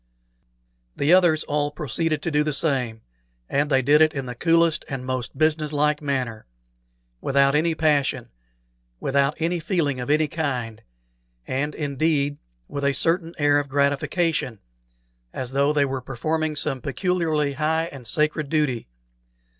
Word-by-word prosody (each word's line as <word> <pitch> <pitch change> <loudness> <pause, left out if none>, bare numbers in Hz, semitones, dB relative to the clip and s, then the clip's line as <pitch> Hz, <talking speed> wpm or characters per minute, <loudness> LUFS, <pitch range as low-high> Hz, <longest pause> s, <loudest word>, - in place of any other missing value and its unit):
The 145 +5 +3
others 175 -4 +4
all 145 -1 -1
proceeded 150 +2 -2
to 170 - -1
do 150 0 +2
the 150 0 -1
same, 130 -7 0 0.5
and 145 +1 0
they 135 -2 +3
did 150 +4 +5
it 155 -1 +4
in 135 -2 -3
the 125 - -5
coolest 165 +4 +2
and 135 -3 -5
most 130 0 -4
business 155 0 +1
like 150 0 +1
manner, 130 - -3 0.7
without 140 0 +3
any 160 +2 +2
passion, 150 -4 +1 0.7
without 140 +1 +1
any 170 +2 0
feeling 160 -6 -1
of 125 - -5
any 155 +1 +3
kind, 125 -8 -3 0.6
and, 145 +3 -2
indeed, 145 0 0 0.3
with 140 - -5
a 140 0 +2
certain 165 +4 +1
air 145 -1 +3
of 145 -1 -4
gratification, 140 - 0 0.8
as 130 -1 -4
though 140 +2 +2
they 145 -2 +2
were 135 -1 -3
performing 155 +5 -2
some 140 -3 -2
peculiarly 155 -1 0
high 155 +3 0
and 130 -4 -9
sacred 150 +2 0
duty. 150 -7 0
145 Hz, 145 wpm, -23 LUFS, 135-155 Hz, 0.8 s, did